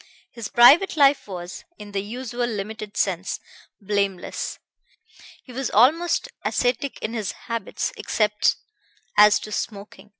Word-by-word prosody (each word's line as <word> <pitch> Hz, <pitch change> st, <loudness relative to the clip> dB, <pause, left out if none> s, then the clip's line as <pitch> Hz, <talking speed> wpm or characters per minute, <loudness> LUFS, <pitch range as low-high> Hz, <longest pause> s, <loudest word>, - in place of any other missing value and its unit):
His 230 Hz, -2 st, -6 dB
private 300 Hz, +10 st, +6 dB
life 280 Hz, -4 st, +4 dB
was, 180 Hz, -2 st, -7 dB
in 205 Hz, -1 st, -10 dB
the 200 Hz, -1 st, -1 dB
usual 240 Hz, +3 st, -4 dB
limited 210 Hz, -1 st, -6 dB
sense, 190 Hz, 0 st, -1 dB, 0.4 s
blameless. 200 Hz, -2 st, -2 dB, 0.9 s
He 255 Hz, -, -13 dB
was 265 Hz, +1 st, -2 dB
almost 325 Hz, -, +3 dB, 0.2 s
ascetic 250 Hz, +2 st, 0 dB
in 220 Hz, -, -3 dB
his 215 Hz, -4 st, -3 dB
habits, 230 Hz, -, -3 dB
except 210 Hz, -, +1 dB, 0.6 s
as 210 Hz, 0 st, +7 dB
to 215 Hz, -, -8 dB
smoking. 205 Hz, -1 st, -6 dB
215 Hz, 125 wpm, -23 LUFS, 205-250 Hz, 0.9 s, as